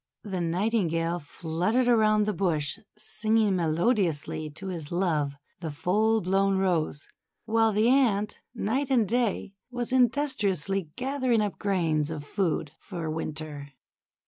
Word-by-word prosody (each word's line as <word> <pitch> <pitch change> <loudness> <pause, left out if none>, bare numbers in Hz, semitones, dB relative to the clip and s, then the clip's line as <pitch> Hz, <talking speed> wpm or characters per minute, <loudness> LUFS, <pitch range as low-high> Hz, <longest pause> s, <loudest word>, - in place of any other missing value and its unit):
The 190 -4 -3
Nightingale 170 -2 0
fluttered 175 - -1
around 215 -3 +4
the 210 - 0
bush, 170 -2 0 0.2
singing 215 -1 +1
melodiously 165 - 0
to 190 +6 -7
his 165 -5 -6
love 160 -6 0 0.2
the 165 -2 -4
full 215 +9 +1
blown 195 +2 +2
Rose, 170 -6 0 0.4
while 225 0 +3
the 215 +2 +2
Ant, 230 -6 +2 0.2
night 255 +6 -1
and 240 -6 +3
day, 230 -3 0 0.2
was 245 -1 -3
in 255 -2 +5
dustriously 195 - -1
gathering 260 -3 +1
up 205 -2 -2
grains 165 -7 +1
of 155 -2 -5
food 165 -4 -1
for 170 -5 -5
Winter. 155 -3 -5
195 Hz, 130 wpm, -27 LUFS, 160-225 Hz, 0.4 s, in